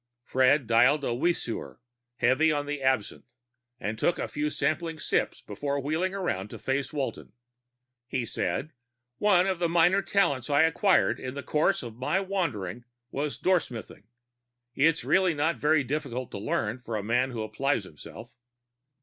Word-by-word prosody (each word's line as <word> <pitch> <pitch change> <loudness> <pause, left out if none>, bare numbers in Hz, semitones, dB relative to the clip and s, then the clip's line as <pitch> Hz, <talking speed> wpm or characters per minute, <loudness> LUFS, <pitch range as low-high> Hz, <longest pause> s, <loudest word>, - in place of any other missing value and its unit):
Fred 130 +2 +3
dialed 135 +6 +4
a 120 - 0
Weesuer, 135 -3 -2 0.4
heavy 130 +7 +3
on 145 -1 -1
the 145 -1 -4
absinthe, 130 -6 0 0.5
and 110 +1 -4
took 175 - +2
a - - -2
few 150 +1 -2
sampling 165 +1 -1
sips - - -1
before 140 +7 -3
wheeling 160 +7 -1
around 105 - -2
to - - -8
face 135 +1 -2
Walton. 145 -3 -4 0.7
He 125 -2 -2
said, 155 +6 -3 0.5
"One 190 -3 +4
of 190 -3 -1
the 170 -1 +1
minor 175 +3 +4
talents 140 -12 +1
I 145 +2 +5
acquired 175 +4 +3
in 130 +1 -6
the 140 - -5
course 155 +3 +1
of 115 -2 -8
my 130 +9 0
wanderings 135 - -3 0.3
was 145 +1 -2
doorsmithing. 130 - -1 0.7
It's 160 +5 +2
really 185 -3 +3
not 160 +3 +1
very 150 0 +3
difficult 130 -2 -3
to - - -5
learn, 110 +3 -1
for 115 -2 -5
a 105 - -2
man 120 +4 +1
who 115 -4 -4
applies 110 +3 -1
himself." 95 +7 -12
140 Hz, 160 wpm, -28 LUFS, 120-165 Hz, 0.7 s, I